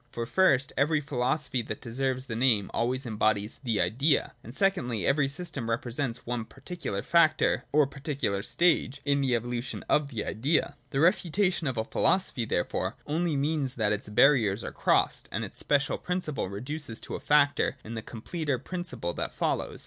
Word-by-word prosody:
Fo 120 Hz, -1 st, -4 dB
first, 140 Hz, -3 st, +3 dB
every 150 Hz, +2 st, +2 dB
philosophy 130 Hz, -1 st, -1 dB
that 110 Hz, -1 st, -6 dB
deserves 130 Hz, +2 st, -2 dB
the 115 Hz, -4 st, -5 dB
name 115 Hz, -5 st, +2 dB
always 130 Hz, +3 st, -1 dB
em 110 Hz, -3 st, -5 dB
bodies 105 Hz, 0 st, +1 dB
the 115 Hz, -5 st, 0 dB
Idea: 140 Hz, +5 st, +2 dB
and 115 Hz, -, -9 dB
secondly, 135 Hz, -, +1 dB
every 140 Hz, 0 st, +3 dB
system 140 Hz, -5 st, -4 dB
represents 120 Hz, +1 st, -2 dB
on 120 Hz, -2 st, -2 dB
particular 140 Hz, -, -5 dB
factor 170 Hz, -2 st, +3 dB
or 150 Hz, 0 st, +5 dB
particular 135 Hz, -7 st, -2 dB
stage 155 Hz, 0 st, +2 dB
in 140 Hz, -1 st, +2 dB
the 130 Hz, -3 st, +2 dB
evolution 120 Hz, +1 st, -3 dB
of 150 Hz, -2 st, +2 dB
th 115 Hz, -6 st, -4 dB
Idea. 140 Hz, +9 st, 0 dB
The 135 Hz, -1 st, 0 dB
refutation 180 Hz, -1 st, +2 dB
of 130 Hz, -3 st, -2 dB
a 110 Hz, -, +1 dB
philosophy, 135 Hz, -1 st, +1 dB
therefore, 85 Hz, -, -1 dB
only 160 Hz, +1 st, 0 dB
mean 145 Hz, 0 st, 0 dB
that 105 Hz, -2 st, +2 dB
its 105 Hz, 0 st, -4 dB
barriers 110 Hz, -3 st, +4 dB
are -, -, -5 dB
crossed, -, -, +1 dB
and -, -, -2 dB
its -, -, -11 dB
special 140 Hz, -2 st, +1 dB
principle 180 Hz, -, -2 dB
reduce 125 Hz, +4 st, -5 dB
to -, -, -8 dB
a -, -, -3 dB
factor 145 Hz, -1 st, +3 dB
in 110 Hz, -, -7 dB
the 110 Hz, -, -4 dB
completer 140 Hz, +6 st, -3 dB
principle 175 Hz, -, -4 dB
that -, -, -4 dB
follows. -, -, -1 dB
135 Hz, 170 wpm, -28 LUFS, 115-150 Hz, -, or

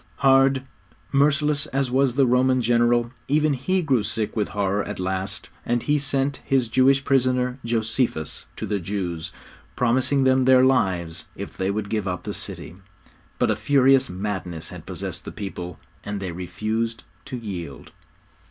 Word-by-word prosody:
Hard, 135 Hz, -1 st, +4 dB, 0.5 s
merciless 145 Hz, +1 st, +2 dB
as 135 Hz, -1 st, -1 dB
was 130 Hz, -1 st, +2 dB
the 135 Hz, -1 st, +4 dB
Roman 130 Hz, +1 st, +3 dB
general, 120 Hz, 0 st, +2 dB, 0.2 s
even 150 Hz, +1 st, +2 dB
he 180 Hz, +8 st, 0 dB
grew 135 Hz, -7 st, +2 dB
sick 105 Hz, +1 st, -2 dB
with 105 Hz, -2 st, 0 dB
horror 100 Hz, 0 st, -1 dB
at -, -, -6 dB
last, 95 Hz, +2 st, -3 dB
and 120 Hz, 0 st, 0 dB
he 150 Hz, 0 st, +2 dB
sent 140 Hz, 0 st, 0 dB
his 130 Hz, -3 st, +1 dB
Jewish 135 Hz, +3 st, +3 dB
prisoner, 125 Hz, -1 st, +1 dB
Josephus, 115 Hz, -, -1 dB
to -, -, -4 dB
the 105 Hz, -1 st, -1 dB
Jews, 90 Hz, -3 st, -4 dB, 0.4 s
promising 130 Hz, +3 st, +2 dB
them 130 Hz, 0 st, +3 dB
their 130 Hz, 0 st, +6 dB
lives 90 Hz, -10 st, +1 dB
if -, -, -7 dB
they 95 Hz, 0 st, -1 dB
would 100 Hz, +1 st, -2 dB
give 105 Hz, -2 st, -2 dB
up 90 Hz, -1 st, -3 dB
the -, -, -4 dB
city. 80 Hz, -, -3 dB, 0.6 s
But -, -, +2 dB
a -, -, +1 dB
furious 135 Hz, -1 st, +4 dB
madness 90 Hz, -4 st, -4 dB
had -, -, -10 dB
possessed -, -, -4 dB
the -, -, -7 dB
people, 90 Hz, -4 st, -6 dB, 0.3 s
and 105 Hz, -1 st, -4 dB
they 95 Hz, -2 st, -4 dB
refused 110 Hz, +6 st, -3 dB, 0.2 s
to 130 Hz, -, -5 dB
yield. 90 Hz, -, -7 dB
120 Hz, 160 wpm, -24 LUFS, 100-135 Hz, 0.6 s, their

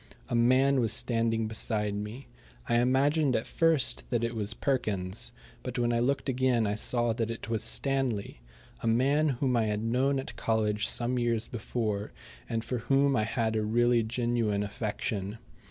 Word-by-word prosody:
A -, -, -1 dB
man 130 Hz, +3 st, +4 dB
was 115 Hz, -4 st, +2 dB
standing 115 Hz, -2 st, +1 dB
beside 105 Hz, -1 st, -1 dB
me. 105 Hz, +6 st, -6 dB, 0.4 s
I 120 Hz, 0 st, +3 dB
imagined 135 Hz, +3 st, +2 dB
at 110 Hz, -, 0 dB
first 165 Hz, -5 st, +2 dB
that 120 Hz, -2 st, 0 dB
it 115 Hz, 0 st, -1 dB
was 110 Hz, +1 st, -3 dB
Perkins, 110 Hz, -4 st, -2 dB, 0.3 s
but 125 Hz, -1 st, -5 dB
when 120 Hz, -1 st, +1 dB
I 115 Hz, -, +1 dB
looked 135 Hz, +4 st, 0 dB
again 130 Hz, -3 st, +2 dB
I 105 Hz, -, 0 dB
saw 120 Hz, +2 st, +1 dB
that 115 Hz, 0 st, -2 dB
it 115 Hz, 0 st, -5 dB
was 110 Hz, -2 st, +1 dB
Stanley, 125 Hz, -, -1 dB, 0.4 s
a -, -, -2 dB
man 140 Hz, +7 st, +3 dB
whom 130 Hz, -1 st, 0 dB
I 115 Hz, -2 st, +2 dB
had 105 Hz, 0 st, -1 dB
known 130 Hz, +4 st, +1 dB
at 135 Hz, -, -5 dB
college 110 Hz, -1 st, 0 dB
some 125 Hz, +1 st, 0 dB
years 115 Hz, -2 st, 0 dB
before, 110 Hz, -3 st, -3 dB, 0.4 s
and 115 Hz, -1 st, -1 dB
for 120 Hz, +2 st, -3 dB
whom 135 Hz, +3 st, +2 dB
I 110 Hz, -3 st, +1 dB
had 110 Hz, 0 st, -1 dB
a 110 Hz, -, +1 dB
really 120 Hz, +2 st, +3 dB
genuine 115 Hz, -3 st, 0 dB
affection. 105 Hz, 0 st, -3 dB
115 Hz, 170 wpm, -29 LUFS, 110-125 Hz, 0.4 s, man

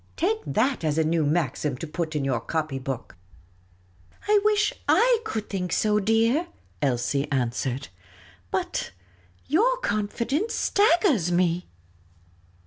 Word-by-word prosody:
Take 430 Hz, +6 st, +1 dB
that 250 Hz, 0 st, +1 dB
as 155 Hz, -1 st, 0 dB
a 160 Hz, -, +3 dB
new 160 Hz, 0 st, +1 dB
maxim 145 Hz, -3 st, -1 dB
to 165 Hz, -, -5 dB
put 160 Hz, 0 st, -4 dB
in 145 Hz, -2 st, 0 dB
your 130 Hz, -4 st, 0 dB
copy 155 Hz, +1 st, -3 dB
book! 130 Hz, -6 st, -6 dB, 0.4 s
" 90 Hz, 0 st, -34 dB
" 90 Hz, -, -24 dB
I 420 Hz, 0 st, +5 dB
wish 425 Hz, 0 st, +2 dB, 0.2 s
I 485 Hz, -1 st, +5 dB
could 220 Hz, -, -4 dB
think 180 Hz, -3 st, -3 dB
so, 210 Hz, +2 st, +2 dB
dear," 225 Hz, -, +2 dB, 0.3 s
Elsie 140 Hz, +1 st, 0 dB
answered. 130 Hz, +1 st, -1 dB, 0.3 s
" 90 Hz, 0 st, -26 dB
But 85 Hz, -, -2 dB, 0.5 s
your 455 Hz, -, +2 dB
confidence 235 Hz, -, -1 dB
staggers 340 Hz, -, +3 dB
me." 175 Hz, 0 st, +1 dB
170 Hz, 135 wpm, -25 LUFS, -, 0.5 s, I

